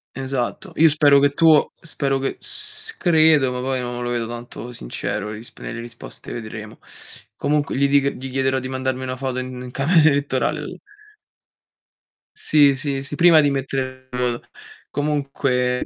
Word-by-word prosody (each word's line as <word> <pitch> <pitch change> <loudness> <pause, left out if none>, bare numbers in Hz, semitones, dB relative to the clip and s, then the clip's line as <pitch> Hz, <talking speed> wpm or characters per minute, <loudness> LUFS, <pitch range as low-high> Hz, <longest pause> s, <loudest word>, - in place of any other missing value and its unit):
Esatto. 130 -2 -3
Io 160 +1 +6
spero 145 -2 +5
che 145 - +4
tu 160 0 +4
spero 140 -4 -1
che 135 - -2
s 440 +1 -1
che 180 - -1
credo, 155 -4 +5
ma 125 - -3
poi 130 0 -1
non 120 0 -4
lo 120 - -2
vedo 120 -1 -1
tanto 120 +1 -8
sincero, 100 - -4
le 105 - -6
risp 115 - -7
nelle 115 - -6
risposte 115 0 -8
vedremo. 110 -2 -8 0.6
Comunque 145 -2 0
gli 140 +1 +3
dic 140 0 +3
gli 130 +1 -6
chiederò 130 0 0
di 130 - -5
mandarmi 130 0 -3
una 130 0 -3
foto 130 -1 -3
in 130 0 -6
in 125 -1 -8
camera 155 +4 +4
elettorale 140 +1 -1 1.6
Sì, 145 -3 +5
sì, 135 0 -1
sì, 140 +2 -4
prima 170 -1 +6
di 145 - +3
mettere 130 -1 -3
il 125 - -5
voto. 120 -1 -2 0.4
Comunque 135 -4 -1
135 Hz, 165 wpm, -21 LUFS, 125-145 Hz, 1.6 s, Io